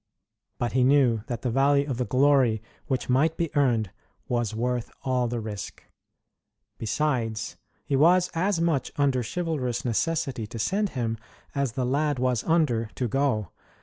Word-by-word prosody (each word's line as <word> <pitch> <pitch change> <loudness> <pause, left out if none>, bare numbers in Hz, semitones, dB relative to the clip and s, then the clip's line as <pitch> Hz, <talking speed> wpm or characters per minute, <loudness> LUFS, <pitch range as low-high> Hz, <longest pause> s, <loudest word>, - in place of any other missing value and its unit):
But 120 - -1
he 130 0 +2
knew 130 -4 +4
that 120 -3 -4
the 125 - 0
value 140 +3 +3
of 130 -4 -2
the 125 - +1
glory 130 -4 +3 0.3
which 130 -4 -1
might 150 +6 +2
be 165 -2 -2
earned 120 -8 +2 0.4
was 120 -3 -1
worth 120 +1 -1
all 125 -2 +1
the 120 0 -2
risk. 105 -2 -6 1.0
Besides, 115 -3 -1 0.3
he 140 - 0
was 175 +5 +4
as 185 +2 +1
much 165 -5 0
under 140 -4 +2
chivalrous 130 -2 -2
necessity 135 -1 -1
to 115 - -8
send 200 - 0
him, 115 -2 -1 0.3
as 140 -4 -1
the 125 0 -1
lad 145 +2 +1
was 125 -3 0
under 145 -10 +2
to 125 - -1
go. 115 -6 0
130 Hz, 155 wpm, -26 LUFS, 115-145 Hz, 1.0 s, knew